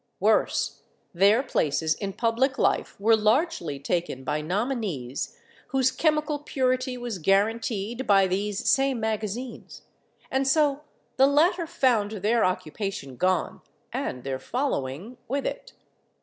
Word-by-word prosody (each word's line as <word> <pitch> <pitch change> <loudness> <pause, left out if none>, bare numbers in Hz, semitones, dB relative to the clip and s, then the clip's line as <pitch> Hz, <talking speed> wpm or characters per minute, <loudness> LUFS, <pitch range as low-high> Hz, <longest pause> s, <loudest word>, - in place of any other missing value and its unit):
Worse, 215 +3 +1 0.3
their 200 +8 +4
places 160 - +1
in 195 +1 -5
public 240 +5 +1
life - - 0
were 225 +3 +5
largely 215 - +1
taken 140 -1 -2
by 150 +3 -1
nominees 185 - -3 0.3
whose 265 -1 +2
chemical 305 +1 +1
purity 255 -2 -1
was 240 -5 -5
guaranteed 220 +5 0
by 195 -1 +5
these 200 +2 -2
same 270 -2 +3
magazines, 220 +3 -4 0.5
and 265 0 +1
so 290 0 +3 0.4
the 270 +1 +6
latter 330 +4 +3
found 255 -11 +2
their 220 +3 +1
occupation 185 -5 -3
gone 185 +4 0 0.3
and 125 - -3
their 135 -1 -3
following 225 - -3
with 275 +3 -2
it. - - -5
220 Hz, 120 wpm, -26 LUFS, 185-265 Hz, 0.5 s, the